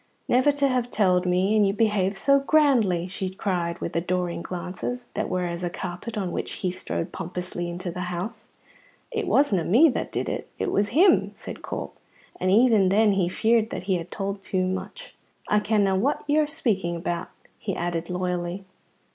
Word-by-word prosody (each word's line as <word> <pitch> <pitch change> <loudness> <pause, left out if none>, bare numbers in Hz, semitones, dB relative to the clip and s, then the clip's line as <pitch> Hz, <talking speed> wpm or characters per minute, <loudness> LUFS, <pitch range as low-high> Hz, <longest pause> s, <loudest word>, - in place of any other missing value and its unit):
"Never 255 +4 +4
to 280 0 +2
have 250 -2 0
telled 185 -4 +2
me, 185 +4 +2
and 210 -2 +4
you 195 - +1
behaved 205 -2 +1
so 275 +8 +4
grandly!" 260 - +3
she 185 0 -3
cried, 175 -3 -2
with 170 - -5
adoring 175 0 -1
glances 185 +9 -5
that - - -2
were 180 -1 -1
as 170 0 -4
a 175 - 0
carpet 180 +7 -6
on 190 -4 -2
which - - -3
he 185 - -2
strode 130 - -4
pompously 175 0 -5
into 175 +1 -4
the 180 - -7
house. 215 +6 -5 0.6
"It 445 -4 -2
wasna 220 - +3
me 245 - +6
that - - -3
did - - -2
it; - - -4
it - - -1
was 205 +1 +1
him," 205 - +5
said 220 - -8
Corp, - - -5 0.5
and 185 - +1
even 215 -2 +5
then 210 +2 +4
he 190 -3 +1
feared 225 +3 +2
that - - -5
he 190 0 0
had 170 0 -7
told 195 0 -4
too 185 -1 -1
much. 190 - -5 0.3
"I 210 - +3
kenna 205 -2 +2
what 250 +10 0
you're 300 +1 +2
speaking 215 - 0
about," 170 0 -3 0.3
he 195 -4 -3
added 170 0 -3
loyally. 180 +1 -2
195 Hz, 185 wpm, -25 LUFS, 180-225 Hz, 0.6 s, me